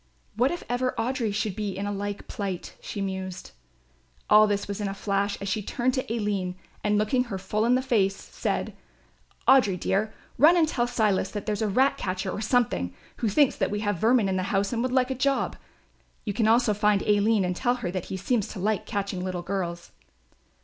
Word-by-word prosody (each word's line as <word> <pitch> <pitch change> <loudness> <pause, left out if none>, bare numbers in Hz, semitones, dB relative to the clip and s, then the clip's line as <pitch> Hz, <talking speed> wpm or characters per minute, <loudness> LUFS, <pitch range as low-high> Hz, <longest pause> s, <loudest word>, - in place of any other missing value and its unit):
"What 245 +5 +3
if 345 +3 -4
ever 250 +1 -1
Audry 240 -2 -1
should 210 -1 -2
be 205 -3 -3
in 200 - -3
a 205 - -2
like 205 0 -4
plight?" 195 -4 -5
she 200 - -5
mused. 190 -1 -5 0.8
All 215 0 +8
this 205 -1 -1
was 200 +1 -4
in 205 - -1
a 195 - -4
flash, 200 0 -1
as 200 - -5
she 205 +2 -1
turned 245 +5 -1
to 260 -4 -2
Aline 205 -5 -1 0.3
and 210 0 +2
looking 230 +5 +1
her 210 -5 -4
full 210 +4 -1
in 245 +2 +4
the 260 - +1
face, 200 -7 +2
said, - - -3 0.7
"Audry, 225 -9 +5
dear, 210 +5 0 0.3
run 320 +6 +7
and 325 -2 +4
tell 245 -5 0
Silas 210 -6 +1
that 205 -2 -5
there's 210 -1 -2
a 220 - +1
ratcatcher 190 -6 +1
or 205 - -4
something, 215 - +1 0.2
who 225 - 0
thinks 275 +6 +3
that - - +1
we 205 0 -2
have 205 -4 -1
vermin 225 0 +4
in 190 -1 0
the - - 0
house 195 +2 0
and 230 - 0
would 255 +1 -1
like 255 0 +2
a - - +2
job. 275 +1 0 0.7
You 205 - -2
can 220 +2 +1
also 230 -1 +4
find 210 -1 +2
Aline 210 -1 +3
and 180 0 -1
tell 245 +5 +1
her 205 -8 -4
that 185 -2 -3
he 190 - -5
seems 210 +2 0
to 205 - -8
like 210 +1 -1
catching 200 -2 -3
little 185 -1 -3
girls." 175 -2 -4
210 Hz, 210 wpm, -26 LUFS, 195-240 Hz, 0.8 s, All